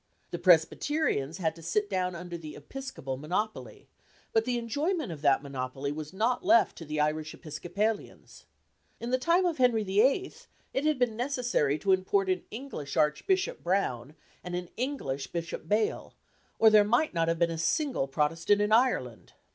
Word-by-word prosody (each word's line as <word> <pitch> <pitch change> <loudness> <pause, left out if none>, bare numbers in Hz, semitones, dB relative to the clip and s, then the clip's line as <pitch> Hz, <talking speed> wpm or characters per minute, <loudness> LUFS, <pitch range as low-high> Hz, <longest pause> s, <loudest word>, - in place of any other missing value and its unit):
The - - -4
Presbyterians 175 - +2
had 160 -4 -1
to 165 - -12
sit 205 +5 0
down 185 -3 -1
under 175 0 -7
the 155 -3 -8
Episcopal 150 - -6
monopoly; 185 +10 -4 0.5
but 225 0 +3
the 250 -1 0
enjoyment 290 - -1
of 155 -3 -8
that 140 -1 +3
monopoly 135 0 -4
was 150 0 -6
not 225 +6 0
left 230 - +4
to 165 - -8
the 150 0 -3
Irish 150 +1 -1
Episcopalians. 200 +7 -4 0.5
In 235 +1 -4
the 255 - +2
time 340 +7 +3
of 335 -5 -1
Henry 240 -4 +3
VIII. 250 - +2 0.4
it 270 - -1
had 305 -2 +2
been 245 -3 +1
necessary 240 - 0
to 195 +4 0
import 190 +1 +2
an 185 -1 0
English 220 - -6
Archbishop 375 - +1
Browne 155 -7 -1 0.3
and 180 0 -5
an 180 -1 -4
English 225 - -3
Bishop 170 -2 -5
Bale, 215 +1 0 0.4
or 220 -1 +6
there 210 -1 +7
might 240 +9 +1
not 165 -1 +1
have 165 0 +1
been 170 0 +2
a 165 - -4
single 260 - 0
Protestant 165 +8 +1
in 210 +1 +1
Ireland. 220 - +1
190 Hz, 170 wpm, -29 LUFS, 155-245 Hz, 0.5 s, there